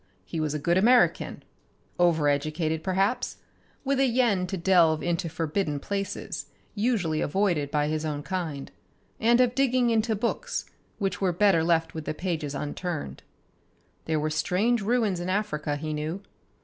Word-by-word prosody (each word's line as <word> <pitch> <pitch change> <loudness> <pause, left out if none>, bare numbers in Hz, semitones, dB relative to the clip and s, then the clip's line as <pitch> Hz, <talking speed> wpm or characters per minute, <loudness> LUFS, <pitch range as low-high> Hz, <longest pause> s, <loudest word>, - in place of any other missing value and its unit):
He 165 - -4
was 155 -1 -1
a - - +1
good 170 +5 +2
American, 240 +5 +3 0.6
over 165 -4 +3
educated 155 +2 0
perhaps, 195 +7 0 0.5
with 275 0 +1
a 270 - +4
yen 230 -7 +2
to 190 - -3
delve 170 -3 +4
into 170 -1 -1
forbidden 160 -1 -1
places 195 -4 -4 0.3
usually 205 -8 0
avoided 170 -4 +1
by 150 0 +1
his 155 0 -1
own 150 -2 -3
kind, 165 - -4 0.5
and 235 +2 +4
of 250 -1 +4
digging 255 -2 +2
into 220 0 +1
books 480 - -2 0.3
which 195 -2 -2
were 190 -2 +2
better 180 -2 +3
left 165 -1 +1
with 160 -2 -6
the - - -3
pages 160 -5 -3
unturned. 145 - -4 0.8
There 160 -1 0
were 155 +1 -1
strange 210 +9 +1
ruins 215 -4 +1
in 175 +1 -3
Africa, 155 -7 -1
he 155 +1 -4
knew. 155 +6 -4
175 Hz, 155 wpm, -27 LUFS, 155-210 Hz, 0.8 s, a